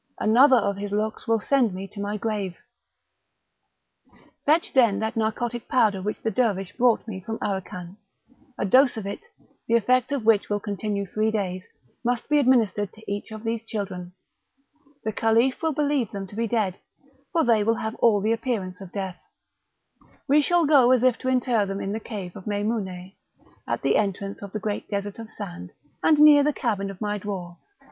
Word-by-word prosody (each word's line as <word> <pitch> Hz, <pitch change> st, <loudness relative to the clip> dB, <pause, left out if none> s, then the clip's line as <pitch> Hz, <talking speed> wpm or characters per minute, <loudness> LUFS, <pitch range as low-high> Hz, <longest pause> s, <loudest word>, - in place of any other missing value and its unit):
another 255 Hz, +5 st, +5 dB
of 200 Hz, -4 st, +1 dB
his 205 Hz, 0 st, -5 dB
looks 215 Hz, +1 st, -2 dB
will 225 Hz, 0 st, +3 dB
send 240 Hz, -4 st, +1 dB
me 190 Hz, +1 st, -6 dB
to 200 Hz, +1 st, -11 dB
my 205 Hz, +1 st, -2 dB
grave. 205 Hz, -4 st, -3 dB, 1.9 s
Fetch 315 Hz, +3 st, +3 dB
then 235 Hz, -7 st, +4 dB
that 220 Hz, +1 st, -2 dB
narcotic 230 Hz, +2 st, -2 dB
powder 215 Hz, -6 st, +2 dB
which 210 Hz, +3 st, -4 dB
the 225 Hz, -, 0 dB
Dervish 195 Hz, -5 st, 0 dB
brought 240 Hz, -2 st, +2 dB
me 190 Hz, -4 st, -6 dB
from 225 Hz, +2 st, -4 dB
Aracan; 185 Hz, -2 st, -5 dB, 0.6 s
a -, -, -1 dB
dose 255 Hz, +5 st, +4 dB
of 215 Hz, -, -5 dB
it, 200 Hz, -, -4 dB, 0.5 s
the 230 Hz, -, +3 dB
effect 250 Hz, +3 st, +2 dB
of 275 Hz, -6 st, -2 dB
which 220 Hz, -3 st, +3 dB
will 205 Hz, 0 st, 0 dB
continue 205 Hz, 0 st, -3 dB
three 215 Hz, +3 st, 0 dB
days, 185 Hz, -4 st, -3 dB, 0.4 s
must 245 Hz, -1 st, -1 dB
be 300 Hz, 0 st, +4 dB
administered 225 Hz, -7 st, +2 dB
to 220 Hz, -, -16 dB
each 205 Hz, 0 st, -4 dB
of 215 Hz, 0 st, -8 dB
these 230 Hz, 0 st, -2 dB
children; 190 Hz, -5 st, -5 dB, 0.9 s
the 220 Hz, -, -1 dB
Caliph 230 Hz, +4 st, +2 dB
will 320 Hz, -1 st, +1 dB
believe 285 Hz, -6 st, 0 dB
them 195 Hz, -1 st, -5 dB
to 195 Hz, -, -12 dB
be 230 Hz, +1 st, -1 dB
dead, 210 Hz, -5 st, -1 dB, 0.5 s
for 335 Hz, -2 st, +2 dB
they 225 Hz, -3 st, +3 dB
will 225 Hz, +2 st, +2 dB
have 220 Hz, -1 st, -3 dB
all 215 Hz, -4 st, +4 dB
the 220 Hz, +3 st, +2 dB
appearance 215 Hz, -6 st, -3 dB
of 190 Hz, -2 st, -10 dB
death; 190 Hz, -2 st, -5 dB, 1.1 s
we 295 Hz, +2 st, +5 dB
shall 345 Hz, +2 st, +2 dB
go 280 Hz, -5 st, +6 dB
as 255 Hz, -1 st, +4 dB
if 255 Hz, -2 st, +3 dB
to 255 Hz, -, -5 dB
inter 250 Hz, -4 st, +2 dB
them 195 Hz, 0 st, -4 dB
in 195 Hz, -, -3 dB
the 220 Hz, -, -2 dB
cave 200 Hz, -6 st, -7 dB
of 195 Hz, -1 st, -10 dB
Meimoune, 205 Hz, -3 st, -2 dB, 0.6 s
at -, -, -2 dB
the -, -, +3 dB
entrance 200 Hz, -1 st, -2 dB
of 200 Hz, -1 st, -8 dB
the 215 Hz, -, -3 dB
great 210 Hz, 0 st, -4 dB
desert 200 Hz, +1 st, -4 dB
of 225 Hz, -1 st, -8 dB
sand, 90 Hz, -, -8 dB, 0.3 s
and 310 Hz, -, +4 dB
near 295 Hz, -1 st, +8 dB
the 295 Hz, +1 st, +2 dB
cabin 205 Hz, -7 st, -2 dB
of 195 Hz, 0 st, -10 dB
my 210 Hz, -1 st, -1 dB
dwarfs. 190 Hz, -, -7 dB
215 Hz, 190 wpm, -25 LUFS, 200-240 Hz, 1.9 s, near